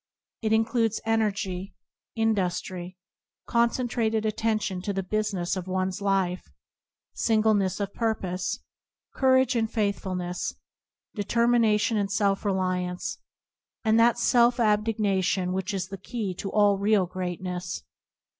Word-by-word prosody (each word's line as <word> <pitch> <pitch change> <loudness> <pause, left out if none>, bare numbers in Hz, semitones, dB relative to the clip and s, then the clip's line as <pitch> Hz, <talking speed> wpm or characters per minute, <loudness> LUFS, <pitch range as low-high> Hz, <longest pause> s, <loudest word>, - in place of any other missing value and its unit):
It 220 -1 0
includes 225 0 +2
energy, 200 -4 -1 0.4
industry, 185 -4 -1 0.5
concentrated 235 -2 +1
attention 215 -3 -1
to 200 +2 -2
the 195 0 -2
business 200 -3 -1
of 185 -1 -5
one's 185 +1 -1
life, 190 -2 +1 0.7
singleness 215 -4 +2
of 200 -1 -3
pur 225 -1 +1
pose, 185 0 -3 0.5
courage 260 -1 +3
and 225 -1 0
faithfulness, 185 -4 -2 0.6
determina 230 +1 +3
tion 225 +1 +1
and 200 -1 -1
self 200 -1 +1
reliance, 185 -2 -1 0.6
and 220 0 +4
that 235 0 +5
self 240 0 +4
abnega 210 -3 +2
tion 180 0 0
which 190 +2 -2
is 190 -2 -3
the 195 -1 -7
key 210 -2 -4
to 195 +2 -5
all 205 -1 +3
real 200 -1 +3
greatness. 180 - -4
205 Hz, 120 wpm, -26 LUFS, 185-225 Hz, 0.7 s, that